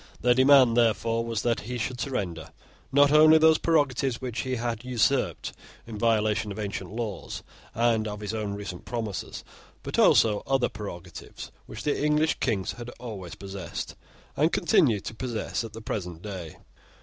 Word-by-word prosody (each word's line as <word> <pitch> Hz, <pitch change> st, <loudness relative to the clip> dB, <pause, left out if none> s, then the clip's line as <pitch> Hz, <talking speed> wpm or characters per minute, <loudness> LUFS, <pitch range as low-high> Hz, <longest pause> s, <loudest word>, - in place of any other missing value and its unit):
Their 125 Hz, 0 st, +4 dB
demand, 130 Hz, -2 st, +6 dB
therefore, 115 Hz, 0 st, +2 dB
was, 115 Hz, -2 st, -3 dB
that 120 Hz, -1 st, +1 dB
he 125 Hz, +3 st, -5 dB
should 125 Hz, +1 st, -3 dB
surrender, 90 Hz, -, -3 dB, 0.4 s
not 140 Hz, +1 st, +5 dB
only 155 Hz, +1 st, +7 dB
those 160 Hz, 0 st, +5 dB
prerogatives 135 Hz, -6 st, +1 dB
which 125 Hz, -3 st, -4 dB
he 130 Hz, -1 st, -1 dB
had 115 Hz, -1 st, -3 dB
usurped 125 Hz, -3 st, 0 dB, 0.3 s
in 110 Hz, -2 st, -7 dB
violation 110 Hz, -2 st, +1 dB
of 100 Hz, -, -7 dB
ancient 100 Hz, -2 st, -4 dB
laws 110 Hz, -2 st, -5 dB, 0.3 s
and 115 Hz, -2 st, +2 dB
of 105 Hz, -1 st, -5 dB
his 105 Hz, 0 st, -4 dB
own 105 Hz, -2 st, -3 dB
recent 100 Hz, -3 st, -7 dB
promises, 110 Hz, -5 st, -5 dB, 0.4 s
but -, -, -2 dB
also 105 Hz, -2 st, +5 dB
other 135 Hz, -1 st, +2 dB
prerogatives 90 Hz, -5 st, -9 dB, 0.2 s
which -, -, -8 dB
the 145 Hz, -1 st, 0 dB
English 150 Hz, +1 st, +2 dB
Kings 105 Hz, -7 st, 0 dB
had 120 Hz, 0 st, -8 dB
always 100 Hz, -8 st, -7 dB
possessed, 95 Hz, -2 st, -6 dB, 0.4 s
and 155 Hz, +4 st, +2 dB
continue 145 Hz, -, +3 dB
to -, -, -6 dB
possess 115 Hz, -1 st, -3 dB
at 115 Hz, -, -8 dB
the 115 Hz, -, -8 dB
present 90 Hz, -6 st, -5 dB
day. 95 Hz, -6 st, -7 dB
115 Hz, 160 wpm, -27 LUFS, 105-130 Hz, 0.4 s, only